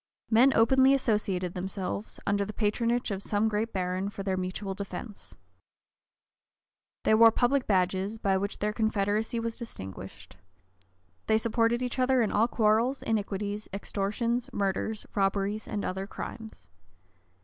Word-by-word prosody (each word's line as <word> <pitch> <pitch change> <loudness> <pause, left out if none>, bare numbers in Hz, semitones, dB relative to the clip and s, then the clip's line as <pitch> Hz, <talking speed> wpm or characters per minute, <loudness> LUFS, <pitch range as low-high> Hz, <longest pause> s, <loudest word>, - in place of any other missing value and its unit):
Men 245 +5 +6
openly 265 +4 +5
associated 200 -8 0
themselves, 190 +3 -4
under 200 0 +1
the 210 +1 -6
patronage 230 +2 0
of 195 -1 -3
some 205 +2 +1
great 220 +1 -1
baron, 185 +1 -2
for 200 -1 -7
their 190 -1 0
mutual 185 +2 -3
defence. 200 +2 -7 1.7
They - - +3
wore 225 +1 +8
public 250 +4 +1
badges, 190 +2 +1
by 195 -3 +1
which 200 +2 -3
their 210 +1 -1
confederacy 220 +1 0
was 230 +1 -4
distinguished. 95 - -9 0.9
They 220 - +4
supported 230 +2 +1
each 250 +1 -3
other 255 -1 +3
in 215 - -1
all 225 +2 +3
quarrels, 230 +4 +2
iniquities, 205 -1 -2
extortions, 215 +5 -2
murders, 200 +2 -2
robberies, 200 +1 0
and 205 - -3
other 190 +1 -3
crimes. 220 - -8
210 Hz, 135 wpm, -28 LUFS, 195-230 Hz, 1.7 s, wore